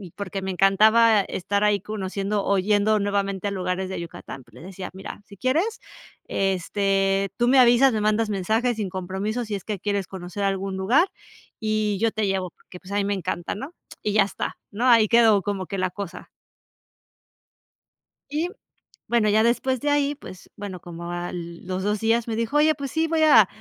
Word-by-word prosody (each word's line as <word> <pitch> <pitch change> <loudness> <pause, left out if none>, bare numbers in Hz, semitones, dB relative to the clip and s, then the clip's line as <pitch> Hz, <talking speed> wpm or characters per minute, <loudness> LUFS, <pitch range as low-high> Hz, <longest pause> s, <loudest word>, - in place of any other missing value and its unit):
porque 195 -1 -5
me 190 - -2
encantaba 215 +4 +5
estar 200 +2 -2
ahí, 210 -1 +3
conociendo 200 0 -3
o 200 -1 +2
yendo 210 +2 +2
nuevamente 200 -1 -1
a - - -2
lugares 185 -1 -2
de 190 - -4
Yucatán. 150 -5 -8
Pues 120 - -25
le 125 - -13
decía: 185 +1 -8
"Mira, 190 +1 -9
si 200 -2 -14
quieres, 320 - 0 0.5
este, 195 0 0
tú 240 - +2
me 265 +2 +5
avisas. 250 +1 +6
Me 215 - 0
mandas 215 +1 +1
mensajes 220 +5 0
sin 205 -3 -2
compromiso 190 +6 -3
si 210 -2 -3
es 195 - -6
que 210 -2 -4
quieres 200 -1 -1
conocer 190 +1 -6
algún 195 0 -1
lugar, 245 - +3 0.5
y 215 -2 0
yo 225 0 +2
te 215 -1 -1
llevo 190 -2 -1
porque, 180 - -15
pues, 190 +1 -13
a - - -2
mí 200 - +1
me 205 - 0
encanta", 180 -1 -3
¿no? 275 +11 -7 0.3
Y 210 - 0
ya 210 -1 +5
está, 200 - -5
¿no? 225 +5 -2
Ahí 230 -3 +6
quedó 225 -3 +5
como 195 -1 -3
que 195 - -5
la 185 0 +1
cosa. 195 -1 -8 2.0
Y, 320 +4 -1 0.6
bueno, 230 -3 +2
ya 215 +2 +4
después 255 +2 +1
de 295 - 0
ahí, 290 0 +2
pues 185 -9 -12
bueno, 195 -4 -7
como 170 0 -7
al 175 -1 -6
los 185 +1 -3
2 210 0 0
días 225 +1 +2
me 225 - -2
dijo: 230 +5 0
"Oye, 310 +1 +4
pues 275 -3 -5
sí, 320 0 +1
voy 320 -1 +1
a 225 -10 +7
205 Hz, 195 wpm, -24 LUFS, 190-225 Hz, 2.0 s, a